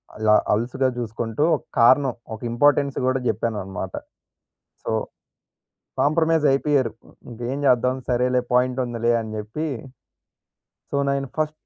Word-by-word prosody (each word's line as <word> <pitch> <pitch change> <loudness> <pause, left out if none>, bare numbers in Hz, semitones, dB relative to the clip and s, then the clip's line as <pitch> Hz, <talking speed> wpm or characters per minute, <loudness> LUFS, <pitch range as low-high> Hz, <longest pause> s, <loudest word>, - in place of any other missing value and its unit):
అల 110 0 -1 0.2
అలుసుగా 125 +4 0
జుసుకుంటూ 115 +3 -2
ఒక - - -7 0.2
కారణం 130 +2 +5 0.2
ఒక 110 - -7
ఇంపార్‌టెన్స్ 140 +2 +2
గూడా 130 +1 +1
జేప్పానన్నమాట. 95 -6 -3 0.9
సో - - -3 1.1
కాంప్రమైజ్ 160 +1 +2
అయిపోయారు. 135 -3 +1 0.4
ఇంకేం 120 +3 -4
చేద్దాం 125 0 +3
సరేలే 125 +1 +2
పాయింట్ 125 +1 +2
ఉందిలే 120 -1 0
అని 110 -1 -6
జేప్పి 110 +9 -4 1.3
సో 140 - +1
నైను 140 0 -1
ఫస్ట్ 155 -1 0
125 Hz, 115 wpm, -23 LUFS, 115-140 Hz, 1.3 s, కారణం